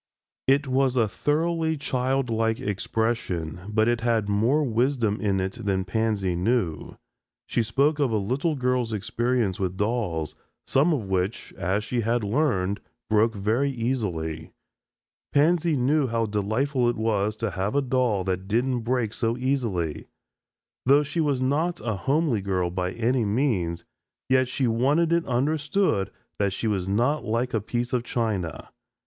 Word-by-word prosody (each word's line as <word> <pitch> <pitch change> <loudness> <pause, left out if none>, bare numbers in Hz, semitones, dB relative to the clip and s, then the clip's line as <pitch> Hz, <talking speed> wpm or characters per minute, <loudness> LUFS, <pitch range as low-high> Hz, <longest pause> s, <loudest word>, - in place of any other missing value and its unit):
It 140 +2 +4
was 130 0 +1
a 115 -3 +3
thoroughly 160 - 0
childlike 125 -5 0
expression, 100 -5 -2
but 110 +1 +2
it 120 -1 +1
had 115 -3 +1
more 115 +9 +2
wisdom 120 -3 +1
in 100 -2 +1
it 95 +5 -3
than 95 -2 0
Pansy 100 -2 0
knew. 90 -4 -1 0.5
She - - 0
spoke 140 +7 +1
of 140 -3 +2
a 110 - +1
little 130 +10 0
girl's 125 -3 0
experience 115 0 0
with 95 -1 -2
dolls, 105 -8 -1 0.3
some 145 +6 +3
of 140 -8 0
which, 95 +3 -2
as 95 +4 -1
she 120 +2 -1
had 115 +1 0
learned, 100 -5 +1 0.3
broke 110 +1 +3
very 110 +8 +1
easily. 95 - -2 0.8
Pansy 165 +2 +3
knew 135 +3 +2
how 115 -1 0
delightful 115 +5 0
it 120 - -2
was 105 -1 0
to 110 -1 -2
have 95 +7 -2
a 140 - +4
doll 125 -6 +1
that 95 0 -2
didn't 120 +4 +1
break 115 -2 -1
so 115 0 -1
easily. 115 - -1 0.8
Though 140 +3 +5
she 150 +3 -2
was 140 -4 +1
not 160 +6 0
a 110 - -2
homely 135 - +1
girl 90 -2 -1
by 90 +1 -2
any 120 +1 +1
means, 100 -7 0 0.4
yet 130 0 +4
she 130 +2 -1
wanted 140 +9 +2
it 170 0 +1
understood 145 - +1 0.3
that 100 -2 +1
she 105 - -4
was 100 -4 0
not 125 +9 +1
like 115 +3 -1
a 110 - +1
piece 120 +3 -3
of 125 -2 +1
china. 105 -10 -2
115 Hz, 155 wpm, -25 LUFS, 100-130 Hz, 0.8 s, Though